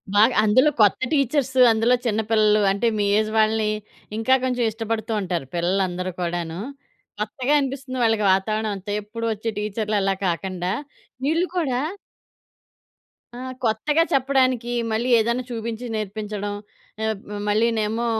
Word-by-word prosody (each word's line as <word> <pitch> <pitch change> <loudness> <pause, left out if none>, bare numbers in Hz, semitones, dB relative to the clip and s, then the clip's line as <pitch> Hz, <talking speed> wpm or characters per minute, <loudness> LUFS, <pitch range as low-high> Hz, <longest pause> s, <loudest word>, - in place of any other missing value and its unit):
బాగా 225 +4 +5
అందులో 255 +8 +5
కొత్త 205 -2 +5
టీచర్సు 270 -2 +2
అందులో 225 +3 +3
చిన్న 220 -2 +1
పిల్లలు 215 -1 +4
అంటే 200 +4 0
మీ 205 - +1
ఏజ్ 215 0 -1
వాళ్ళని 215 0 +2 0.5
ఇంకా 225 +4 +2
కొంచెం 250 -1 0
ఇష్టపడుతూ 225 0 -3
ఉంటారు 175 -7 -2
పిల్లలు 180 +3 +1
అందరూ 180 +1 -4
కూడాను. 170 0 -3 0.6
కొత్తగా 250 +7 -1
అనిపిస్తుంది 270 -1 -4
వాళ్ళకి 225 -2 +2
వాతావరణమంతా. 205 0 -2
ఎప్పుడు 230 +3 -6
వచ్చే 220 +2 -4
టీచ్చర్‌లలా 210 -1 0
కాకండా. 180 +1 -2 0.5
వీళ్ళు 330 +5 +2
కూడా 265 -8 0 1.6
ఆ! - - -8 0.3
కొత్తగా 245 +8 +2
చెప్పడానికి 260 -3 +2 0.2
మళ్ళీ 235 +3 0
ఏదైనా 235 +3 0
చూపించి 230 0 -4
నేర్పించడం. 210 -1 -4 0.5
ఆబ్ 215 -3 -2 0.3
మళ్ళీనేమో 220 +1 +1
220 Hz, 120 wpm, -23 LUFS, 205-245 Hz, 1.6 s, బాగా